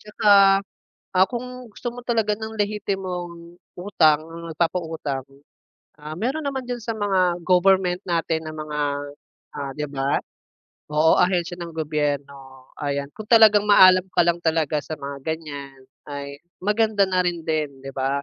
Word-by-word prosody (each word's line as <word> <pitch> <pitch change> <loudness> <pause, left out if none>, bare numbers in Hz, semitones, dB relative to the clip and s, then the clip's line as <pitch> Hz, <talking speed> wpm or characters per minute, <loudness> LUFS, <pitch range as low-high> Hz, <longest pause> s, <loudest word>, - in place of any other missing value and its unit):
Tsaka, 210 0 0 0.9
ah, 185 +1 +6
kung 250 -1 -7
gusto 240 - -7
mo 245 0 -9
talaga 220 -3 +1
ng 220 0 -6
lehitimong 180 -5 -4 0.2
utang, 160 -6 +3 0.3
nagpapautang, 160 -5 -2 0.8
ah, 150 +1 -8
meron 265 +9 -2
naman 265 -2 -3
diyan 245 -1 -3
sa 230 - -2
mga 185 -4 +1
government 185 0 +3
natin 165 -2 -1
na - - -6
mga, 150 -1 -4 0.8
ah, 140 -1 -4
'di 150 0 -2
ba? 135 0 0 0.7
Oo, 155 +2 +4
ahensiya 175 -1 +1
ng 170 -1 -7
gobyerno. 140 -4 -3 0.2
Ayan 140 -1 -2
kung 215 - -8
talagang 215 -3 +6
maalam 185 -2 +7
ka 180 - +3
lang 170 0 +2
talaga 160 -2 +1
sa 155 - -5
mga 140 0 -6
ganiyan 145 -4 -6 0.3
ay 140 0 -7 0.2
maganda 210 0 +2
na 185 -1 +2
rin 175 -1 -1
din 150 -4 -2
'di 135 - -7
ba? 135 +1 -1
170 Hz, 145 wpm, -23 LUFS, 150-205 Hz, 0.9 s, maalam